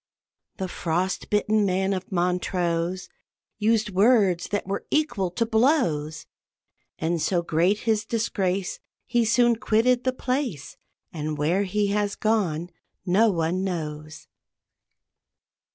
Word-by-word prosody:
The 190 - -3
frost 180 +2 -2
bitten 210 0 +2
man 190 0 +1
of 185 +1 -5
Montrose 180 0 -1 0.5
Used 220 0 +1
words 195 -3 +3
that 205 - -2
were 195 +1 -4
equal 295 - 0
to 205 +7 -1
blows; 220 - +1 0.7
And 165 0 -1
so 175 0 +1
great 175 +6 +1
his 220 -2 +1
disgrace, 195 -4 -2 0.3
He 240 -1 +1
soon 235 +1 +3
quitted 245 +1 +2
the 255 - +1
place, 255 - -3 0.4
And 155 -2 -3
where 170 +7 +1
he 205 +1 0
has 205 0 0
gone 180 -6 0 0.3
no 205 +5 +4
one 175 0 0
knows. 155 -4 -5
190 Hz, 120 wpm, -25 LUFS, 175-220 Hz, 0.7 s, no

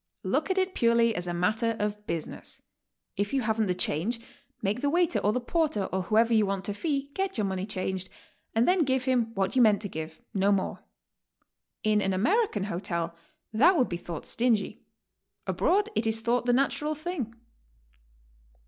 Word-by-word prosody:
Look - - 0
at 380 - +1
it 375 0 +1
purely 235 0 +3
as 180 -2 -3
a - - -1
matter 215 +6 +1
of 210 0 -3
business. 165 -2 -5 0.5
If 205 +6 -1
you 265 - +1
haven't 220 -1 +1
the 180 - 0
change, 185 +7 -1 0.4
make 210 +4 0
the 285 - +2
waiter 335 -7 +2
or 205 +1 +2
the 250 - 0
porter 285 - 0
or 190 - +1
who 215 +4 0
ever 230 +1 +4
you 220 -1 +5
want 195 -1 -2
to 205 - -2
fee, 280 +3 -2
get 385 0 -2
your 210 - +1
money 190 0 -2
changed, 190 -2 -3 0.5
and 225 +2 +3
then 360 -2 +4
give 260 -2 0
bim 245 -4 +1
what 195 +2 0
you 255 - +5
meant 215 -3 +5
to - - -2
give, 160 -2 -7
no 195 0 +2
more. 195 -2 -1 1.0
In 215 -1 +3
an 195 - 0
Ameri 390 - +2
can 205 - -2
hotel 170 -3 -3 0.4
that 310 - +5
would 255 - +2
bethought 170 -2 -5
stingy; 230 -4 +1 0.6
abroad 410 +3 +2
it 225 - 0
is 220 0 +2
thought 240 +2 0
the - - +5
natural 280 +4 +1
thing. 300 -8 -4
220 Hz, 185 wpm, -28 LUFS, 195-265 Hz, 1.0 s, you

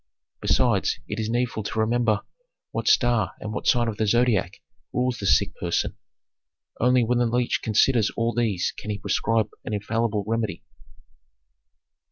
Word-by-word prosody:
Besides, - - +2
it 105 - -4
is 110 0 -2
needful 120 -1 -1
to 110 +1 -4
remember 110 -1 +2 0.5
what - - -3
star 120 -5 +3
and 105 0 -5
what - - -4
sign 120 -1 +3
of 110 -2 -3
the 110 - 0
Zodiac 120 -5 +2 0.3
rules 125 -1 -1
the 100 - -2
sick - - +3
person. - - -1 0.8
Only 125 +1 +4
when 120 +2 +1
the 120 - +2
leech 120 +1 0
considers 110 +1 +3
all 115 0 0
these 110 -7 0
can 105 - -8
he 105 - -2
prescribe 110 +2 0
an 105 - -3
infallible 105 0 -1
remedy." 110 -1 -2
115 Hz, 155 wpm, -24 LUFS, 105-120 Hz, 0.8 s, Only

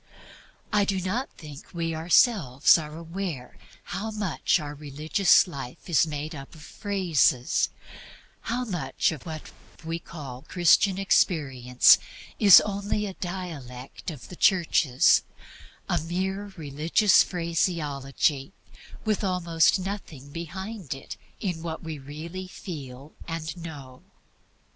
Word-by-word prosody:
I 210 -1 +4
do 195 -1 0
not 205 +9 -2
think 150 +2 -12
we 165 -1 -1
ourselves 160 - +4
are 155 -1 -3
aware 165 -5 -5 0.3
how 200 +5 -4
much 205 -6 0
our 145 -2 -6
religious 150 +5 +3
life 140 -2 -8
is 165 -2 +3
MADE 150 +1 -5
UP 135 +1 -10
OF - - -13
PHRASES; 175 - +1 0.8
how 250 +2 -1
much 170 - -1
of 160 0 -8
what 155 -1 -7 0.3
we 165 +1 -3
call 140 -7 -9
Christian 180 +5 +3
Experience 135 -10 +4 0.4
is 200 -4 +10
only 205 +1 -2
a 195 - -5
dialect 160 -11 -7
of 150 -7 -9
the 180 - -9
Churches, 165 -9 +4 0.7
a - - +1
mere 190 +5 -3
religious 160 +7 +3
phraseology 155 -4 -1 0.5
with 215 -1 0
almost 175 -2 +2
nothing 185 -8 -6
behind 180 - -6
it 135 - -9 0.2
in 180 -6 -3
what 165 0 -5
we 160 -2 -6
really 160 +7 -7
feel 145 -7 -9
and 165 -1 -4
know. 145 -7 -9
165 Hz, 120 wpm, -26 LUFS, 145-190 Hz, 0.8 s, is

